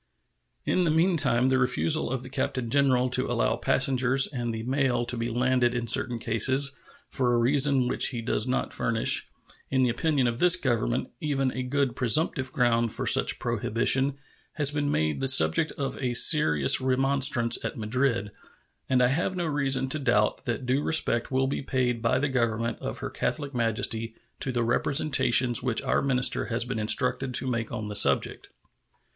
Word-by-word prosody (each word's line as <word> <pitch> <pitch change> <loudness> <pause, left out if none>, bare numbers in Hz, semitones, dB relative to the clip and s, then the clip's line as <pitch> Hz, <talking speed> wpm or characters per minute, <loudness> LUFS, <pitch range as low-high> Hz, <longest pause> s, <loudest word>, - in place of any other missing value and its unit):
In 185 - 0
the 170 - 0
meantime 155 -7 +2
the 130 0 +1
refusal 130 +5 +1
of 130 0 -4
the 130 - -9
Captain 125 -3 -3
Generalto 130 -2 +1
allow - - 0
passengers 130 0 +2
and 120 -4 -5
the 110 0 -6
mail 130 -1 -1
to 125 +1 0
be 115 0 -3
landed 125 0 0
in 120 -1 -3
certain 120 +2 +2
cases, 130 +5 +1 0.4
for 125 -2 -1
a 120 - +1
reason 135 +1 +2
which 125 - +1
does 110 +2 -1
not 130 - -2
furnish, 115 -1 +1 0.4
in 130 -1 +1
the 125 - +1
opinion 140 +1 -1
of 120 0 -2
this 180 0 +6
Government, 120 - -2
even 135 -3 -2
a 130 - -5
good 130 -1 -2
presumptive 130 +1 -1
ground 120 -3 0
for - - -5
such - - +3
prohibition, 135 +4 -1 0.4
has 145 -2 0
been 145 -1 -2
made 80 - -1
the 135 - -1
subject 130 - +4
of 140 -4 -5
a 125 -2 -2
serious 80 - +4
remonstrance 130 -2 +1
at - - -5
Madrid, 115 -2 -2 0.6
and 125 -1 +2
I 125 - +3
have 170 +7 -2
no 175 -1 -3
reason 135 -3 0
to 155 - 0
doubt 115 -6 0
that 120 +2 -4
due 130 +3 0
respect 135 -7 0
will 130 0 0
be 135 - -3
paid 125 -3 -2
by 115 +2 +1
the 145 +3 -1
Government 115 -3 -2
of - - -6
Her - - -6
Catholic 145 -2 -4
Majesty 115 -1 -2 0.2
to 135 - -4
the 120 -1 -1
representations 125 -1 +1
which 125 -2 -2
our - - 0
minister 125 -2 +1
has 115 0 -2
been 125 -2 -4
instructed 125 +4 0
to - - +1
make 115 -3 -3
on 110 -3 -5
the 105 - -7
subject. 100 - +2
125 Hz, 175 wpm, -26 LUFS, 115-135 Hz, 0.6 s, this